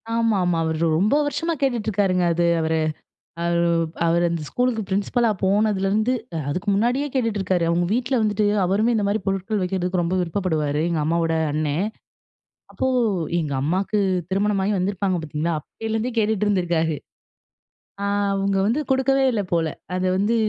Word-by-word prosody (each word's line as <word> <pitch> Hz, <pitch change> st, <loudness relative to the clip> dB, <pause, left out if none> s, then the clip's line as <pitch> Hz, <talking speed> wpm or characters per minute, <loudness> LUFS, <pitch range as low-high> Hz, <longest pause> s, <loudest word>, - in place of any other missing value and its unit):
ஆமா, 230 Hz, -3 st, +2 dB
ஆமா. 175 Hz, -2 st, +1 dB
அவரு 160 Hz, -1 st, -1 dB, 0.2 s
ரொம்ப 210 Hz, +9 st, +3 dB
வருஷமா 290 Hz, +4 st, -1 dB
கேட்டுட்ருக்காருங்க 205 Hz, -8 st, +1 dB
அது 170 Hz, +1 st, +1 dB, 0.2 s
அவரு. 160 Hz, 0 st, 0 dB, 0.7 s
அவர் 170 Hz, 0 st, +1 dB, 0.5 s
அவரு 170 Hz, +1 st, +2 dB
அந்த 165 Hz, -2 st, -2 dB
ஸ்கூலுக்கு 245 Hz, -3 st, 0 dB
பிரின்சிபலா 215 Hz, +4 st, +1 dB
போனதுலேருந்து 205 Hz, +3 st, +2 dB, 0.4 s
அதுக்கு 180 Hz, +7 st, -3 dB
முன்னாடியே 245 Hz, +7 st, +1 dB
கேட்டுட்டு 230 Hz, -5 st, 0 dB
இருக்காரு. 185 Hz, -2 st, +1 dB
அவங்க 175 Hz, +1 st, +1 dB
வீட்ல 255 Hz, +2 st, -1 dB
வந்துட்டு 210 Hz, 0 st, +1 dB, 0.2 s
அவருமே 210 Hz, +6 st, +2 dB
இந்த 210 Hz, -2 st, +1 dB
மாரி 210 Hz, +1 st, 0 dB
பொருட்கள் 195 Hz, +2 st, -1 dB
வைக்கிறதுக்கு 180 Hz, -1 st, -1 dB
ரொம்ப 170 Hz, +2 st, -1 dB
விருப்பப்படுவாரு. 160 Hz, -5 st, -1 dB
எங்க 165 Hz, -3 st, 0 dB
அம்மாவோட 165 Hz, 0 st, +1 dB, 0.2 s
அண்ணன். 155 Hz, +6 st, 0 dB, 0.8 s
அப்போ 260 Hz, -, -1 dB, 0.5 s
எங்க 150 Hz, -3 st, -2 dB
அம்மாவுக்கு 190 Hz, +8 st, 0 dB, 0.3 s
திருமணமாகி 200 Hz, +1 st, +1 dB
வந்திருப்பாங்க 190 Hz, 0 st, 0 dB
பாத்தீங்களா, 155 Hz, +2 st, -2 dB
அப்போலருந்தே 225 Hz, -, -4 dB
கேட்டுட்டு 215 Hz, -1 st, +1 dB
இருந்திருக்காரு. 170 Hz, -5 st, +1 dB, 1.1 s
ஆ -, -, -1 dB, 0.3 s
அவங்க 195 Hz, 0 st, 0 dB
வந்து 245 Hz, +8 st, +1 dB
கொடுக்கவே 270 Hz, 0 st, +3 dB
இல்ல 210 Hz, -3 st, 0 dB
போல. 165 Hz, -1 st, +2 dB, 0.3 s
அத 185 Hz, 0 st, -1 dB
வந்து 205 Hz, +4 st, +1 dB
195 Hz, 140 wpm, -22 LUFS, 170-220 Hz, 1.1 s, ரொம்ப